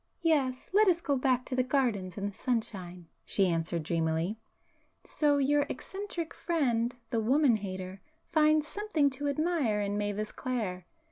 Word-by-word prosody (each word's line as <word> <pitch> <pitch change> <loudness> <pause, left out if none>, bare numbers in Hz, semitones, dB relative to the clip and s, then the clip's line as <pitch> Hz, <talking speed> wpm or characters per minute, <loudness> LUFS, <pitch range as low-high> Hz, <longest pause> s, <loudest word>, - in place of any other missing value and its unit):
"Yes,—let 315 +6 +2
us 345 -2 +4
go 285 -4 0
back 255 -1 +1
to 255 - -3
the 255 - +3
gardens 245 -9 0
and 200 0 -2
the - - -22
sunshine;"—she 190 -5 -2
answered 165 -1 -1
dreamily—"So 170 - -2
your 285 +1 +2
eccentric 385 -4 -5
friend,—the 240 -7 -1
woman 255 +1 +4
hater,—finds 295 - -1
something 345 -9 0
to 285 +2 -3
admire 285 -7 +1
in 205 0 -1
Mavis 205 +1 -2
Clare! 210 -9 -3
250 Hz, 125 wpm, -30 LUFS, 200-295 Hz, -, us